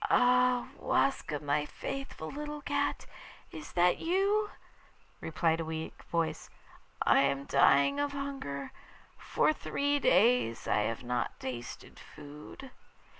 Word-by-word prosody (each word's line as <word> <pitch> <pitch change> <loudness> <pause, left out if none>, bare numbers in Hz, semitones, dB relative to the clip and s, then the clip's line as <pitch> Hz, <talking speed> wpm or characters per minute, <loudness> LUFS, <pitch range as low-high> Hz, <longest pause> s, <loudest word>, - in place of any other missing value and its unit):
'Ah! 250 0 +3
Waska, 155 - 0
my 145 0 0
faithful 270 - -6
little 295 +1 -6
cat, - - -1 0.5
is 155 -2 -9
that 175 0 +3
you?' 400 +5 +1 0.7
replied 160 0 0
a - - -1
weak 160 0 -6
voice. 160 -2 -2 0.6
'I - - +5
am 140 0 +1
dying 140 - +4
of 290 0 0
hunger. 275 - -5 0.5
For - - +1
three 285 -1 -1
days 215 - +3
I - - +2
have 115 +2 -5
not 125 0 -2
tasted 120 -2 -7
food. 150 - -11
175 Hz, 120 wpm, -31 LUFS, -, 0.7 s, I